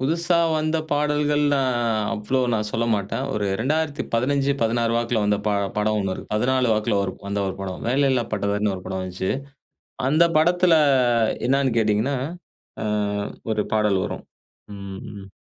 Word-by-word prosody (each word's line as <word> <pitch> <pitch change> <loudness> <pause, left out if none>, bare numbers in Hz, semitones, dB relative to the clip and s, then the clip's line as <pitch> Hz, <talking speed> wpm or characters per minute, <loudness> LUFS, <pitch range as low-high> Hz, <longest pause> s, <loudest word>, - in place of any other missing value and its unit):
புது 140 +5 +1
புதுசா 170 +1 +1 0.2
வந்த 155 +1 0
பாடல்கள் 150 0 +1
நான் 130 -3 +1 0.4
அவ்ளோ 110 +5 -1
நான் 105 -1 0
சொல்ல 115 +1 -1
மாட்டேன். 105 +5 -2
ஒரு 105 -1 -1 0.2
2015 140 -2 0
16 115 0 +1
வாக்கில 120 -1 0
வந்த 105 0 +2
ப - - +3 0.3
படம் 105 +1 +1
ஒண்ணு 95 -1 -1
இருக்கு. - - -10
14 130 +3 +2
வாக்கில 105 0 +1
ஒரு 95 - -3
வந்த 100 0 -2
ஒரு 95 - -3
படம். 95 -2 -5
"வேலையில்லா 130 -2 +2
பட்டதாரினு" 100 0 0
ஒரு 90 - -8
படம் 95 - -3
வந்துச்சு. 95 +1 -3 0.8
அந்த 155 +5 +4
படத்துல 175 +2 +4 0.7
என்னான்னு 135 -1 +2
கேட்டீங்கன்னா, 110 +5 +1 0.7
ஆ - - -2 0.7
ஒரு 105 -1 0
பாடல் 105 -3 +2
வரும். - - -5 0.5
ம் 100 +1 -8
115 Hz, 150 wpm, -23 LUFS, 105-140 Hz, 0.8 s, அந்த